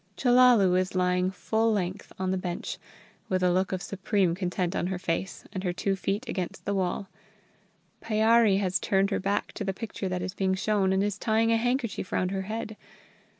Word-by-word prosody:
Chellalu 245 -7 +5
is 185 0 -2
lying 180 0 +2
full 220 +4 0
length 185 -2 -2
on 185 0 -1
the - - +1
bench, 175 -1 -4 0.5
with 185 -1 0
a 180 - +4
look 185 +2 +1
of 185 -1 -3
supreme 195 -2 0
content 180 0 -2
on 175 - 0
her 190 0 -2
face, 180 +1 -3
and 190 -2 -4
her 180 -2 -1
two 195 +2 -1
feet 200 +5 -2
against 195 -3 -4
the 200 - 0
wall. 190 0 -1 0.9
Pyârie 220 -1 +4
has 190 -1 0
turned 195 +1 +1
her - - +1
back 200 +1 -1
to - - -5
the 195 -1 -2
picture 200 -2 -5
that 180 -1 -2
is 185 0 -4
being 190 -1 0
shown, 195 -1 +1
and 190 +1 +2
is 205 0 -2
tying 225 +1 +2
a 230 - +4
handkerchief 245 -4 -1
round 185 0 0
her 195 -1 -2
head. 220 -1 -4
195 Hz, 195 wpm, -27 LUFS, 185-215 Hz, 0.9 s, Chellalu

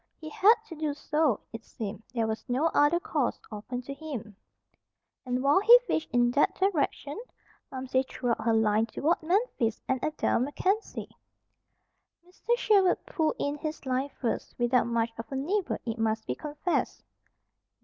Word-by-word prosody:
He 310 - -8
had 415 +8 +5
to 375 - -10
do 300 -2 -2
so, 300 -5 +1
it 225 0 -7
seemed. 210 -1 -6
There 230 -2 0
was 220 0 -3
no 280 +7 +1
other 290 +4 +4
course 295 -6 -1
open 245 +4 -5
to 275 - -6
him. 270 -9 -7 0.9
And 250 +1 -1
while 285 +6 +5
he 465 +5 +9
fished 320 - -1
in 240 0 +3
that 285 +4 +2
direction, 350 -2 -1 0.5
Momsey 260 0 0
threw 245 -2 -2
out - - -1
her 230 0 +2
line 220 0 +2
toward 315 +9 0
Memphis 330 - 0
and 260 -2 -1
Adair 310 - +1
MacKenzie. 370 - -2 1.1
Mr. 470 +6 -1
Sherwood 395 -6 +3
pulled 325 -11 0
in 285 +1 -2
his 310 -2 -5
line 260 +2 -1
first, 240 - -3
without 240 0 +2
much 230 -1 0
of 225 - -7
a - - -3
nibble, 355 +9 -1
it 230 -1 -3
must 220 0 0
be 125 - -2
confessed. 300 - -2
275 Hz, 160 wpm, -28 LUFS, 235-320 Hz, 1.1 s, he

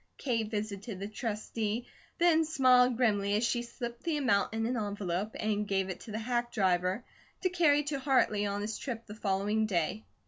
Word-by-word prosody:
Kate 230 -5 -1
visited 205 -1 -4
the 200 - -4
Trustee, 220 +1 -3 0.3
and 325 -2 +4
smiled 255 -5 +5
grimly 205 -4 +2
as 215 - +1
she 240 +1 +1
slipped 240 0 -6
the 330 -3 -1
amount 240 -9 +2
in 225 0 -1
an 245 +2 0
envelope 205 -2 -2
and 210 -1 0
gave 195 -1 0
it 180 - -7
to 220 - -10
the 215 - -3
hack 240 +1 -1
driver 185 +3 +1 0.4
to 370 - +3
carry 300 -5 +4
to 285 -1 -2
Hartley 250 -7 +2
on 200 0 -2
his 215 0 -4
trip 235 -4 -5
the 210 - -9
following 210 +1 0
day. 190 +3 -1
220 Hz, 185 wpm, -31 LUFS, 205-250 Hz, 0.4 s, smiled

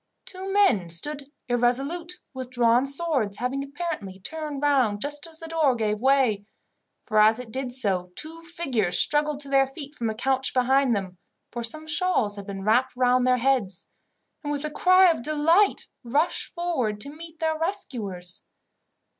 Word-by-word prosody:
Two 380 +1 -2
men 375 - +3
stood 275 - -2 0.2
irresolute 270 +8 0 0.2
with 260 -1 -6
drawn 245 +1 +3
swords, 275 -9 0
having 260 +3 -2
apparently 280 - -5
turned 300 +5 -5
round 260 -8 +2
just 295 +6 -2
as 325 -1 -7
the 330 - -9
door 315 -5 +2
gave 215 -2 -1
way; 260 -6 +3 0.6
for 215 -2 +1
as 215 +1 +5
it 250 -3 -9
did 260 +1 -3
so, 195 -8 0
two 325 +2 -5
figures 275 - -1
struggled 295 -1 +3
to 280 - -7
their 270 -1 +3
feet 280 +1 -9
from 235 -6 -3
a 220 - -3
couch 265 +3 0
behind 260 0 +3
them, 185 -3 -5 0.3
for 240 0 -5
some 310 +7 -4
shawls 310 - +1
had 200 -1 -9
been 195 -1 -6
wrapped 235 +6 +2
round 250 0 +3
their 250 0 +4
heads, 240 -8 0 0.6
and 290 - -3
with 290 0 -3
a 305 - -4
cry 370 +4 +5
of 320 - -3
delight 310 +8 +2 0.2
rushed 285 +8 0
forward 265 -12 -1
to 285 +4 -3
meet 325 0 -11
their 315 0 -1
rescuers. 225 - -3
270 Hz, 170 wpm, -25 LUFS, 225-310 Hz, 0.6 s, as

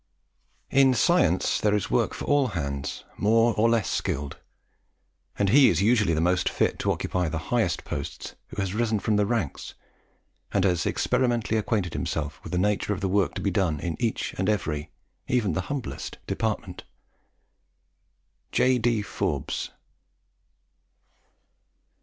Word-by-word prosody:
"In 135 -1 +5
science 115 - +3
there 105 0 +3
is 105 - -2
work - - +1
for - - -6
all 145 -2 +3
hands, 70 -2 -4
more 115 +2 +3
or 110 +2 +3
less 115 -7 +2
skilled; 70 0 -3 1.0
and 100 -1 +2
he 135 +4 +7
is 85 +2 +1
usually 105 -7 +3
the - - 0
most 90 +2 +2
fit - - 0
to - - +1
occupy 90 -3 -1
the 80 - -3 0.2
higher 115 -7 +3 0.2
posts - - -5
who - - -8
has 95 -1 -1
risen 110 0 +1
from 105 +1 0
the 105 -1 +2
ranks, 110 - -3 0.8
and 100 - +1
has 90 -4 +1
experimentally 120 -4 +1
acquainted 105 -4 0
himself 75 -2 -3
with - - -8
the 90 - -1
nature 105 +2 +1
of 95 - -5
the 95 - 0
work 95 0 +1
to - - -3
be 100 - 0
done 90 -8 0
in 85 +2 -3
each 115 -2 -1
and 95 +2 +1
every, 75 -8 -1 0.4
even 115 -8 +1
the 90 - 0
humblest 130 - -5
department." - - -3 1.7
J. 130 -1 +3
D. 115 -2 +1
Forbes. - - -3
105 Hz, 150 wpm, -26 LUFS, 90-115 Hz, 1.7 s, he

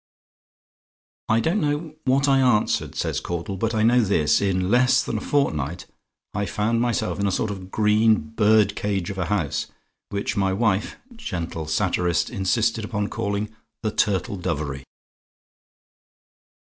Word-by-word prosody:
"I 110 - +4
don't 170 - +1
know 150 +1 -1
what 135 +2 +3
I 135 -1 +4
answered," 125 -5 +2
says - - -1
Caudle, 85 +3 -4
"but 115 +4 -1
I 110 - +2
know 120 +2 +5
this: 80 -8 +2
in 95 -1 0
less 125 +2 +4
than 110 - -2
a - - -10
fortnight 85 - -1 0.5
I 100 0 -1
found 115 +4 0
myself 120 -3 -1
in 100 - +1
a - - +1
sort 110 +3 -1
of 100 -2 -6
a - - -9
green 110 +3 +3
bird 105 -2 +3
cage 100 -3 -2
of 95 - -6
a 90 - 0
house, 85 -6 -1 0.4
which 100 0 -2
my 95 -1 +1
wife 105 -1 0 0.2
gentle 85 - -5
satirist 85 +2 0
insisted 110 +1 0
upon 105 -1 -2
calling 100 +2 -3 0.3
'The 110 - 0
Turtle 100 -2 0
Dovery.'" 75 -7 -3
105 Hz, 150 wpm, -23 LUFS, 95-115 Hz, 0.5 s, know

